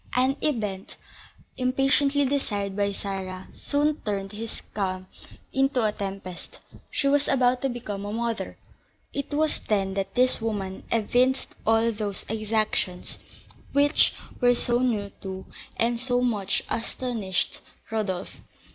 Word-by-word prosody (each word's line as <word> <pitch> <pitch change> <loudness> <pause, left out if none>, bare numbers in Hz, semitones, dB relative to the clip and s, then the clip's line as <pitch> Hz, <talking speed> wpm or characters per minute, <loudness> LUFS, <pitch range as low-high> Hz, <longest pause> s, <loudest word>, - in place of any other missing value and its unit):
An 260 +2 +4
event, 210 -10 -1 0.6
impatiently 270 +2 +3
desired 205 -8 -1
by 200 0 +2
Sarah, 190 -2 -4
soon 295 +1 +1
turned 195 -2 -2
this 220 +2 -5
calm 185 -2 -1 0.5
into 270 -2 +3
a 210 - +3
tempest, 195 -3 -5 0.3
she 280 - +1
was 285 +1 +3
about 250 -2 +3
to 270 - +1
become 210 -5 -4
a 205 - -3
mother. 230 0 -2 0.6
It 280 +1 -3
was 305 +1 +2
then 195 -2 +1
that 195 0 -2
this 255 -1 +4
woman 200 -4 -2
evinced 245 +4 +2
all 225 +1 +5
those 205 -2 -3
exactions 215 -4 0 0.5
which 290 +2 +5 0.2
were 245 -1 +5
so 240 0 +2
new 215 -6 +1
to, 190 -1 -5 0.3
and 235 0 +2
so 245 0 +1
much 210 -6 +1
astonished, 225 -5 -1 0.3
Rodolph. 200 -4 -2
225 Hz, 130 wpm, -27 LUFS, 200-255 Hz, 0.6 s, all